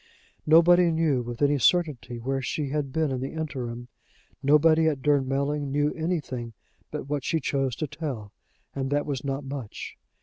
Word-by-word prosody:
Nobody 170 +2 +6
knew 160 -5 +1
with 120 +3 -4
any 145 0 +3
certainty 145 -7 +1
where 135 +3 -2
she 140 +2 -2
had 145 -1 -2
been 155 0 0
in 130 - -2
the 135 - -4
interim: 125 -7 -4 0.5
nobody 155 +3 +5
at 140 -4 -1
Durnmelling 140 0 +1
knew 145 +1 +1
anything 145 -8 -3 0.4
but - - -5
what 145 -2 -2
she 160 - 0
chose 135 -3 -1
to 155 - -2
tell, 135 -9 -6 0.4
and 135 -1 -2
that 145 +1 +1
was 135 -4 -3
not 140 0 -2
much. 135 -5 -7
140 Hz, 165 wpm, -26 LUFS, 130-155 Hz, 0.5 s, Nobody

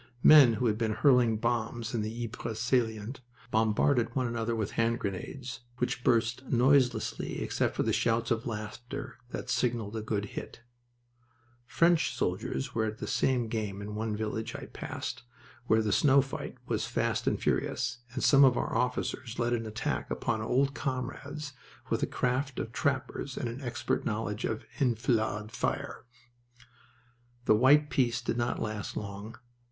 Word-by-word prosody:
Men 145 -6 +9
who 115 +3 -1
had 110 -1 +1
been 110 -2 +1
hurling 120 -1 +4
bombs 115 0 -1
in 115 - 0
the 110 +3 -3
Ypres 115 -1 -5
salient 115 0 0 0.3
bombarded 115 +2 +2
one 130 -2 +1
another 115 -1 -1
with 110 -3 -2
hand 115 0 +1
grenades, 115 +5 -5 0.2
which 125 0 -2
burst 115 +2 +2
noiselessly 130 +1 +2
except - - 0
for - - +1
the 110 - +1
shouts 115 +1 +1
of 115 +1 0
laughter 120 +4 -6
that 125 - -5
signaled 115 -4 0
a 110 - -2
good 105 -1 -1
hit. - - -7 1.1
French 165 +1 +3
soldiers 65 0 -2
were 110 -1 +1
at 110 0 -3
the - - -5
same 125 -3 +1
game 105 -3 -3
in 105 +1 -6
one 110 0 -2
village 110 +1 -3
I - - -6
passed, - - -5 0.5
where 110 0 +4
the 105 - 0
snow 140 +5 +5
fight 135 - -6
was - - -1
fast - - -1
and - - +2
furious, - - 0 0.2
and 130 - -2
some 140 -1 +7
of 130 -3 +6
our - - -1
officers 125 -1 -1
led 120 0 +1
an 115 -2 -1
attack 110 +2 -2
upon 110 -2 -1
old 135 +5 +1
comrades 140 +3 -4 0.4
with - - +2
the - - 0
craft 130 +2 -1
of 115 - -3
trappers 135 0 -2
and - - -2
an 120 +4 -6
expert 120 -2 -2
knowledge 105 -1 -2
of 110 - -3
enfilade 110 -4 +1
fire. 115 - -3 1.4
The - - +6
white 140 +6 +5
peace 120 -3 +2
did - - -2
not 120 0 0
last 110 -2 -4
long. 105 +2 -6
115 Hz, 160 wpm, -30 LUFS, 110-130 Hz, 1.4 s, Men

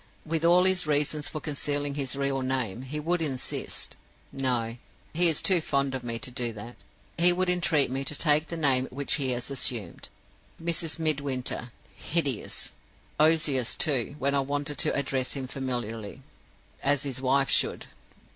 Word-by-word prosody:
With 160 0 -1
all 175 +2 +6
his 185 -3 +2
reasons 150 0 +1
for 155 - -5
concealing 145 -1 -2
his 140 -2 -2
real 140 -1 0
name, 130 -5 -1
he 135 +3 -5
would 170 +3 0
insist 135 -5 -3 0.3
no, 120 -3 -1 0.4
he 170 +2 +7
is 160 - +1
too 185 -3 +5
fond 140 -3 0
of 130 -1 -3
me 115 -1 -3
to 130 +2 -6
do 120 -1 -2
that 115 +3 -9 0.4
he 175 +1 +7
would 180 0 +1
entreat 160 -7 +2
me 135 +1 -2
to 150 - -1
take 150 0 +2
the 170 - -5
name 130 -4 +2
which 140 +2 -1
he 130 - 0
has 125 +2 -3
assumed. 120 -8 -1 0.5
Mrs. 165 -1 -1
Midwinter. 140 -6 -1 0.3
Hideous! 145 -9 -2 0.5
Ozias, 155 -5 +3
too, 140 -2 +1
when 140 0 0
I 140 - +3
wanted 145 +1 -3
to - - +2
address 135 -2 -1
him 135 -2 -4
familiarly, 120 -5 -5 0.6
as 145 0 +2
his 130 -3 -3
wife 135 +1 +2
should. - - +1
140 Hz, 165 wpm, -27 LUFS, 130-155 Hz, 0.6 s, he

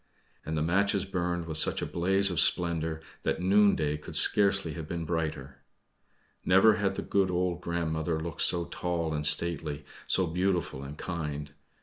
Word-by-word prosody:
And 80 +1 -4
the 75 - 0
matches 100 +4 +1
burned 90 -2 -3
with 80 -1 +2
such - - +2
a - - -1
blaze 95 +3 +1
of 85 - -1
splendor, 80 -2 0 0.2
that - - -2
noonday 95 -6 +2
could 75 - -10
scarcely 100 -5 +4
have 80 0 -7
been 85 0 -4
brighter. 75 -5 -4 0.8
Never 100 +4 +5
had 100 -2 -1
the - - -4
good 95 -2 +1
old 90 -1 -1
grandmother 80 -1 -2
looked 80 +1 -5
so 85 -1 +2
tall 85 -3 -3
and 75 0 -3
stately, 75 -2 +1 0.2
so 95 - +1
beautiful 90 -4 -2
and 70 +2 -9
kind. 75 -4 -5
85 Hz, 160 wpm, -28 LUFS, 80-95 Hz, 0.8 s, Never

